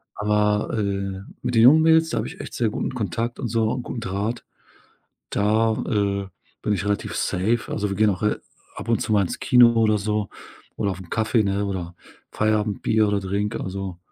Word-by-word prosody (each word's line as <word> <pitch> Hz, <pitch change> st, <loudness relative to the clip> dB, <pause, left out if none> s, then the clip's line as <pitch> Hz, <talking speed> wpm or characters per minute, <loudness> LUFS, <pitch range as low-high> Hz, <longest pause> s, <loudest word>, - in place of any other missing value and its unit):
Aber, 105 Hz, 0 st, +1 dB
äh, 100 Hz, -2 st, -2 dB, 0.2 s
mit 125 Hz, -, -2 dB
den 115 Hz, -, +5 dB
jungen 150 Hz, +6 st, +8 dB
Mädels, 160 Hz, 0 st, +5 dB
da -, -, -2 dB
habe -, -, -1 dB
ich -, -, -8 dB
echt -, -, -9 dB
sehr 115 Hz, -2 st, +1 dB
guten 105 Hz, -, -3 dB
Kontakt 115 Hz, +1 st, -3 dB
und -, -, -2 dB
so 115 Hz, -1 st, +1 dB
und 125 Hz, -1 st, -3 dB
guten 120 Hz, -, -5 dB
Draht. 105 Hz, +4 st, -3 dB, 0.9 s
Da, 110 Hz, +2 st, +2 dB
äh, 100 Hz, -2 st, 0 dB, 0.3 s
bin 105 Hz, -, 0 dB
ich 100 Hz, 0 st, -2 dB
relativ 105 Hz, 0 st, -2 dB
safe. 110 Hz, +6 st, 0 dB
Also, 105 Hz, -1 st, -1 dB
wir 100 Hz, -, -3 dB
gehen 110 Hz, 0 st, +4 dB
auch 95 Hz, -, -2 dB
re 105 Hz, 0 st, 0 dB, 0.3 s
ab -, -, -8 dB
und 115 Hz, -, +2 dB
zu -, -, -2 dB
mal 105 Hz, -, +4 dB
ins 90 Hz, -, -3 dB
Kino 125 Hz, -2 st, +6 dB
oder 110 Hz, -1 st, +3 dB
so 105 Hz, 0 st, -2 dB, 0.5 s
oder 100 Hz, -, 0 dB
auf 95 Hz, -, -6 dB
'n 90 Hz, -, -13 dB
Kaffee, 110 Hz, +1 st, +1 dB
ne, 100 Hz, 0 st, 0 dB
oder 90 Hz, -3 st, -4 dB, 0.4 s
Feierabendbier 110 Hz, 0 st, +1 dB
oder 100 Hz, 0 st, +1 dB
Drink, 100 Hz, +2 st, -2 dB
also, 95 Hz, -1 st, -5 dB
105 Hz, 200 wpm, -23 LUFS, 100-110 Hz, 0.9 s, jungen